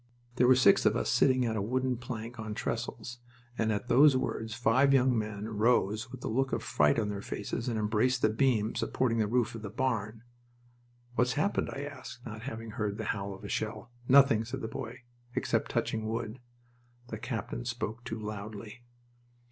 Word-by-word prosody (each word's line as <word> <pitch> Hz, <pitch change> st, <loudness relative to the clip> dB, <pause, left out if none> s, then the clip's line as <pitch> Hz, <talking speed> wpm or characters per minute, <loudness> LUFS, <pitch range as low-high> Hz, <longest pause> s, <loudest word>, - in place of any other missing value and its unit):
There 125 Hz, -, +5 dB
were 130 Hz, -, +7 dB
six 125 Hz, -, +5 dB
of -, -, +3 dB
us -, -, 0 dB
sitting 130 Hz, -2 st, +4 dB
at 110 Hz, -1 st, -1 dB
a 105 Hz, -, 0 dB
wooden 130 Hz, +4 st, 0 dB
plank 120 Hz, -1 st, -7 dB
on 110 Hz, -1 st, -4 dB
trestles, 120 Hz, +2 st, -4 dB, 0.4 s
and 110 Hz, -1 st, +1 dB
at 105 Hz, +2 st, -2 dB
those 135 Hz, +3 st, +6 dB
words 110 Hz, -3 st, -3 dB
five 130 Hz, +3 st, +4 dB
young 130 Hz, -1 st, +4 dB
men 105 Hz, -1 st, -3 dB
rose 110 Hz, +1 st, +1 dB
with 130 Hz, -, -9 dB
a -, -, -2 dB
look 135 Hz, +4 st, 0 dB
of -, -, -1 dB
fright 75 Hz, -1 st, +3 dB
on 105 Hz, -3 st, 0 dB
their 100 Hz, -1 st, -4 dB
faces 105 Hz, +4 st, -4 dB
and 115 Hz, -, -1 dB
embraced 110 Hz, +4 st, +1 dB
the 110 Hz, -, +5 dB
beam 110 Hz, -2 st, +2 dB
supporting 115 Hz, -3 st, 0 dB
the 110 Hz, -, +2 dB
roof 120 Hz, +1 st, +1 dB
of 115 Hz, -, -7 dB
the 105 Hz, -, -5 dB
barn. 115 Hz, -2 st, -2 dB, 0.9 s
"What's 125 Hz, +1 st, +2 dB
happened?" 155 Hz, +8 st, 0 dB
I 140 Hz, -, -5 dB
asked, 130 Hz, -3 st, -9 dB
not 110 Hz, 0 st, -7 dB
having 115 Hz, -2 st, -6 dB
heard 105 Hz, -3 st, -2 dB
the 110 Hz, -, -4 dB
howl 100 Hz, -1 st, -5 dB
of 95 Hz, -, -14 dB
a -, -, -5 dB
shell. 110 Hz, +3 st, -3 dB, 0.2 s
"Nothing," 135 Hz, -4 st, +6 dB
said 120 Hz, +4 st, -5 dB
the 110 Hz, -, -3 dB
boy, 115 Hz, +1 st, -7 dB, 0.3 s
"except -, -, 0 dB
touching 110 Hz, -1 st, -1 dB
wood. 115 Hz, +1 st, -3 dB, 0.7 s
The -, -, -5 dB
captain -, -, -4 dB
spoke 115 Hz, +3 st, -4 dB
too 115 Hz, -1 st, -5 dB
loudly." 105 Hz, +2 st, -7 dB
115 Hz, 190 wpm, -30 LUFS, 110-125 Hz, 0.9 s, were